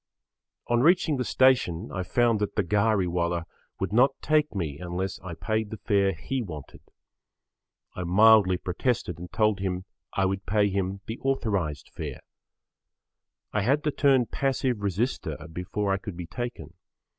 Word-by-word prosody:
On 120 Hz, 0 st, +2 dB
reaching 165 Hz, -1 st, +4 dB
the 125 Hz, -, 0 dB
station 125 Hz, -12 st, +2 dB
I 95 Hz, -, -2 dB
found 115 Hz, +4 st, +2 dB
that 105 Hz, -, -2 dB
the 105 Hz, -, +2 dB
ghari 100 Hz, 0 st, +2 dB
wala 85 Hz, -1 st, -1 dB, 0.3 s
would -, -, -2 dB
not 125 Hz, +5 st, +4 dB
take 150 Hz, -4 st, +1 dB
me 75 Hz, -6 st, -3 dB
unless 90 Hz, +1 st, -3 dB
I 85 Hz, -2 st, -7 dB
paid 110 Hz, +2 st, -1 dB
the 110 Hz, -, -6 dB
fare 100 Hz, -1 st, +2 dB
he 130 Hz, +11 st, -3 dB
wanted. 75 Hz, -, -8 dB, 1.1 s
I 90 Hz, -, -3 dB
mildly 100 Hz, 0 st, +6 dB
protested 90 Hz, -, -2 dB
and 90 Hz, -1 st, -8 dB
told 105 Hz, +1 st, +2 dB
him 95 Hz, -1 st, -2 dB, 0.3 s
I 95 Hz, -, +1 dB
would[Pg 95 Hz, 0 st, 0 dB
5] -, -, -44 dB
pay 105 Hz, 0 st, +3 dB
him 95 Hz, 0 st, -2 dB
the 115 Hz, +3 st, -6 dB
authorised 100 Hz, -, -1 dB
fare. -, -, -6 dB, 1.3 s
I 105 Hz, -, +1 dB
had 140 Hz, +8 st, +2 dB
to 150 Hz, -, +1 dB
turn 135 Hz, -3 st, +3 dB
passive 130 Hz, -3 st, -1 dB
resister 100 Hz, -, -1 dB, 0.2 s
before 95 Hz, +3 st, -1 dB
I -, -, +1 dB
could 100 Hz, -3 st, -7 dB
be 90 Hz, -, -5 dB
taken. 85 Hz, -, -6 dB
100 Hz, 160 wpm, -27 LUFS, 90-120 Hz, 1.3 s, mildly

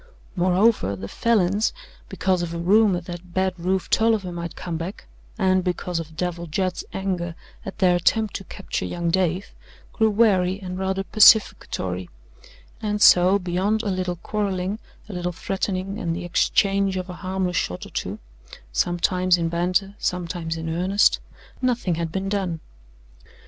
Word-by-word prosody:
Moreover, 185 Hz, -, +2 dB
the 100 Hz, +1 st, -7 dB
Falins, 210 Hz, -, +1 dB, 0.4 s
because 185 Hz, -2 st, 0 dB
of 170 Hz, -1 st, -4 dB
a -, -, -3 dB
rumour 190 Hz, +1 st, +3 dB
that 175 Hz, 0 st, -9 dB
Bad 190 Hz, 0 st, +1 dB
Rufe 185 Hz, +2 st, 0 dB
Tolliver 220 Hz, -5 st, +2 dB
might 170 Hz, -1 st, -6 dB
come 175 Hz, -2 st, -5 dB
back, 170 Hz, +5 st, -6 dB, 0.3 s
and 185 Hz, -3 st, +2 dB
because 180 Hz, -1 st, -2 dB
of 160 Hz, -1 st, -8 dB
Devil 175 Hz, -1 st, -3 dB
Judd's 185 Hz, +3 st, -1 dB
anger 180 Hz, -3 st, -3 dB, 0.3 s
at 195 Hz, -, -6 dB
their 180 Hz, -2 st, +4 dB
attempt 215 Hz, +5 st, +1 dB
to 195 Hz, -, -10 dB
capture 195 Hz, -, -5 dB
young 170 Hz, -1 st, -2 dB
Dave, 185 Hz, +1 st, 0 dB, 0.4 s
grew 220 Hz, -1 st, +3 dB
wary 195 Hz, -4 st, +3 dB
and 185 Hz, -1 st, -6 dB
rather 190 Hz, 0 st, -1 dB
pacificatory: 95 Hz, -, +4 dB, 0.7 s
and 210 Hz, -1 st, -1 dB
so, 185 Hz, 0 st, +7 dB
beyond 195 Hz, +4 st, 0 dB
a 205 Hz, -, -1 dB
little 185 Hz, -1 st, -2 dB
quarrelling, 195 Hz, +1 st, -2 dB, 0.3 s
a 210 Hz, -, -8 dB
little 180 Hz, 0 st, -2 dB
threatening 195 Hz, +3 st, -3 dB
and 170 Hz, -6 st, -2 dB
the 175 Hz, 0 st, -5 dB
exchange 195 Hz, +2 st, +2 dB
of 185 Hz, 0 st, -4 dB
a 180 Hz, -, -7 dB
harmless 185 Hz, -1 st, -1 dB
shot 90 Hz, -, -2 dB
or -, -, -12 dB
two, -, -, -3 dB, 0.6 s
sometimes 180 Hz, -, +2 dB
in 165 Hz, -1 st, -1 dB
banter, 180 Hz, +4 st, 0 dB
sometimes 170 Hz, -2 st, -2 dB
in 160 Hz, 0 st, -5 dB
earnest, 180 Hz, +5 st, +2 dB, 0.4 s
nothing 245 Hz, -8 st, +1 dB
had 165 Hz, 0 st, -3 dB
been 190 Hz, +2 st, -3 dB
done. 190 Hz, -5 st, -1 dB
185 Hz, 155 wpm, -23 LUFS, 175-195 Hz, 0.7 s, so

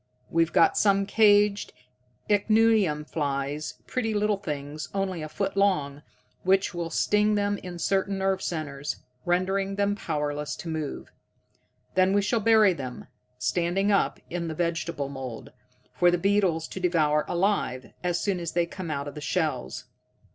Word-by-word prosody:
We've 165 Hz, 0 st, +2 dB
got 165 Hz, -, +4 dB
some 200 Hz, -1 st, +3 dB
caged 205 Hz, -1 st, +3 dB, 0.5 s
ichneumon 210 Hz, -6 st, +3 dB
flies, 145 Hz, 0 st, -3 dB
pretty 225 Hz, -4 st, -2 dB
little 210 Hz, 0 st, +1 dB
things 150 Hz, -4 st, -5 dB
only 190 Hz, -4 st, -1 dB
a 155 Hz, -, -5 dB
foot 195 Hz, +4 st, -2 dB
long, 150 Hz, -8 st, +1 dB, 0.4 s
which 190 Hz, +1 st, +2 dB
will 170 Hz, -1 st, -3 dB
sting 210 Hz, +5 st, +2 dB
them 205 Hz, 0 st, 0 dB
in 180 Hz, -1 st, -8 dB
certain 195 Hz, +3 st, 0 dB
nerve 190 Hz, 0 st, 0 dB
centers, 150 Hz, -5 st, -3 dB, 0.3 s
rendering 190 Hz, +2 st, 0 dB
them 200 Hz, 0 st, +1 dB
powerless 150 Hz, -5 st, -3 dB
to -, -, -9 dB
move. 155 Hz, -3 st, -4 dB, 0.8 s
Then 185 Hz, +1 st, +3 dB
we 200 Hz, 0 st, +3 dB
shall 230 Hz, +3 st, +1 dB
bury 215 Hz, -3 st, +5 dB
them, 130 Hz, -6 st, -7 dB, 0.3 s
standing 175 Hz, +10 st, +1 dB
up, 200 Hz, -, +2 dB
in 170 Hz, -1 st, -3 dB
the 160 Hz, -, -4 dB
vegetable 170 Hz, -3 st, -2 dB
mould, 135 Hz, -4 st, -7 dB, 0.4 s
for 175 Hz, -, +4 dB
the 175 Hz, -, +2 dB
beetles 185 Hz, -4 st, +1 dB
to -, -, -6 dB
devour 155 Hz, -4 st, +2 dB
alive, 175 Hz, -9 st, -1 dB
as 175 Hz, -1 st, 0 dB
soon 195 Hz, -3 st, -1 dB
as 170 Hz, -1 st, -4 dB
they 175 Hz, 0 st, +2 dB
come 170 Hz, 0 st, -7 dB
out 140 Hz, -1 st, -3 dB
of 145 Hz, -, -6 dB
the 150 Hz, -, -8 dB
shells. 150 Hz, -, -2 dB
175 Hz, 155 wpm, -26 LUFS, 150-200 Hz, 0.8 s, bury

